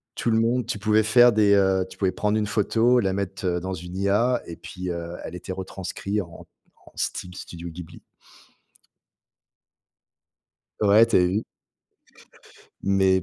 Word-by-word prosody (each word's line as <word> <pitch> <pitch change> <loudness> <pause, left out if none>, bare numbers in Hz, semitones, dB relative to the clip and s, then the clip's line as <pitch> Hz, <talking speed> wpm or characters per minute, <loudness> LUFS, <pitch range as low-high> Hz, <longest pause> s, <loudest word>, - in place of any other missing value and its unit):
Tout 120 - -1
le 110 - +3
monde 120 +1 +1
tu 115 - -3
pouvais 110 +1 +3
faire 120 +3 +6
des, 105 -2 +4
heu, 95 -1 +3
tu - - -13
pouvais 95 -2 +1
prendre 105 +2 0
une 105 - 0
photo, 115 +3 +2
la 95 -4 0
mettre, 95 -1 -4
heu, 90 -1 0
dans 95 +1 -4
une 90 +1 -8
IA, 105 +6 +1
et 85 - -8
puis, 90 0 -7
heu, 85 0 -5
elle - - -7
était 90 +1 -6
retranscrit 95 +2 -4
en 85 -2 -11 0.4
en - - -15
Steam 90 - -3
Studio 85 -1 -8
Ghibli. 85 0 -11 2.8
Ouais, 105 +2 +6
tu - - +2
as - - +7
vu? 95 +5 +1 1.4
Mais 95 -1 +2
95 Hz, 160 wpm, -24 LUFS, 90-110 Hz, 2.8 s, as